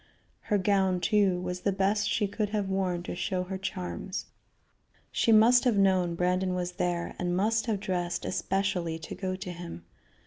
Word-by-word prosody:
Her 210 Hz, -, 0 dB
gown, 190 Hz, -1 st, +2 dB
too, 195 Hz, -1 st, +2 dB
was 180 Hz, 0 st, -4 dB
the 200 Hz, -, +1 dB
best 200 Hz, +2 st, +1 dB
she 210 Hz, -, +1 dB
could 210 Hz, +1 st, -2 dB
have 205 Hz, -2 st, -1 dB
worn 185 Hz, -2 st, -1 dB
to -, -, -5 dB
show 180 Hz, +1 st, -1 dB
her 190 Hz, +1 st, -5 dB
charms. 90 Hz, -, -4 dB, 0.9 s
She 230 Hz, -, +2 dB
must 230 Hz, +3 st, +6 dB
have 245 Hz, -5 st, +2 dB
known 185 Hz, -3 st, +3 dB
Brandon 180 Hz, +1 st, +1 dB
was 180 Hz, -1 st, -2 dB
there, 175 Hz, -1 st, -2 dB
and 180 Hz, -1 st, 0 dB
must 225 Hz, +4 st, +1 dB
have 215 Hz, -3 st, 0 dB
dressed 180 Hz, -3 st, -2 dB
especially 190 Hz, -4 st, -1 dB
to 160 Hz, -, -8 dB
go 185 Hz, -1 st, -3 dB
to 190 Hz, -1 st, -6 dB
him. 170 Hz, -, -8 dB
190 Hz, 175 wpm, -29 LUFS, 180-200 Hz, 0.9 s, must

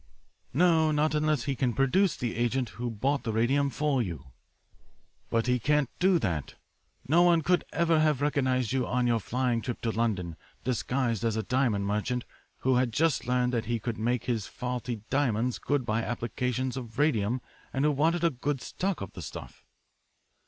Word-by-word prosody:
"'No, 165 Hz, -3 st, +4 dB
not 150 Hz, 0 st, +1 dB
unless 150 Hz, -4 st, +1 dB
he 140 Hz, -1 st, -1 dB
can 125 Hz, -1 st, 0 dB
produce 170 Hz, +8 st, +3 dB
the 120 Hz, -2 st, -3 dB
agent 120 Hz, +1 st, 0 dB
who 120 Hz, +4 st, -4 dB
bought 135 Hz, +6 st, 0 dB
the 115 Hz, -, -3 dB
radium 135 Hz, +6 st, +2 dB
for 140 Hz, 0 st, 0 dB
you.' 75 Hz, -, -6 dB, 1.0 s
"'But 115 Hz, 0 st, +1 dB
he 125 Hz, 0 st, +2 dB
can't 145 Hz, +1 st, +1 dB
do 185 Hz, 0 st, +4 dB
that. 85 Hz, -, -2 dB, 0.5 s
No 160 Hz, +5 st, +5 dB
one 170 Hz, -2 st, +4 dB
could 180 Hz, +3 st, +2 dB
ever 165 Hz, -2 st, +2 dB
have 155 Hz, -3 st, +3 dB
recognised 130 Hz, -4 st, +1 dB
you 130 Hz, -2 st, 0 dB
on 125 Hz, 0 st, +1 dB
your 120 Hz, -1 st, +2 dB
flying 120 Hz, +1 st, 0 dB
trip 120 Hz, 0 st, -4 dB
to 115 Hz, -, 0 dB
London 100 Hz, -8 st, -1 dB, 0.3 s
disguised 120 Hz, -2 st, -1 dB
as 115 Hz, -2 st, +1 dB
a 110 Hz, -, -1 dB
diamond 120 Hz, -6 st, +1 dB
merchant 105 Hz, +5 st, -1 dB, 0.4 s
who 130 Hz, -1 st, +3 dB
had 125 Hz, -1 st, +1 dB
just 155 Hz, +2 st, +1 dB
learned 125 Hz, 0 st, +1 dB
that 115 Hz, -1 st, 0 dB
he 120 Hz, +1 st, 0 dB
could 115 Hz, -1 st, -4 dB
make 120 Hz, +2 st, 0 dB
his 115 Hz, -5 st, -2 dB
faulty 125 Hz, -2 st, -4 dB
diamonds 125 Hz, -3 st, +1 dB
good 145 Hz, -3 st, 0 dB
by 110 Hz, 0 st, 0 dB
applications 125 Hz, +3 st, -2 dB
of 120 Hz, -2 st, -7 dB
radium 125 Hz, -5 st, +2 dB, 0.3 s
and 135 Hz, +2 st, 0 dB
who 150 Hz, -, +4 dB
wanted 160 Hz, +4 st, +1 dB
a 170 Hz, -, +4 dB
good 135 Hz, +2 st, -2 dB
stock 190 Hz, +6 st, -3 dB
of 95 Hz, -, -6 dB
the -, -, -8 dB
stuff.' -, -, -9 dB
125 Hz, 180 wpm, -28 LUFS, 115-145 Hz, 1.0 s, No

